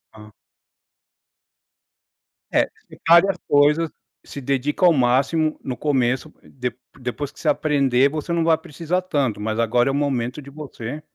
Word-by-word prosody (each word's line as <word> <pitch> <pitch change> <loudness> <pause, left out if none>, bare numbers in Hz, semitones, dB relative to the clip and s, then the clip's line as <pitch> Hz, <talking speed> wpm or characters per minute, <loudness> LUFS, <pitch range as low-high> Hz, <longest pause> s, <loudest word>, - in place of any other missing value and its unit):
Ah. 105 -1 -14 2.2
É, - - +2 0.2
separe 170 +4 +4
as - - -1
coisas, 150 +3 +3 0.3
se - - -8
dedica 140 +6 0
ao 170 - +7
máximo 140 +5 +1
no 130 - -4
começo 130 +1 0
de 125 -3 -5 0.3
depois 130 +3 -4
que - - -18
você - - 0
aprender, 140 -3 +2
você 155 +3 -5
não 170 -1 +1
vai 160 -1 +4
precisar 165 +3 -3
tanto, 140 - -1
mas 110 +1 -2
agora 120 +3 +2
é - - +1
o - - -2
momento 135 -2 -1
de 140 - -12
você, 145 -2 -7
140 Hz, 150 wpm, -22 LUFS, 125-155 Hz, 2.2 s, ao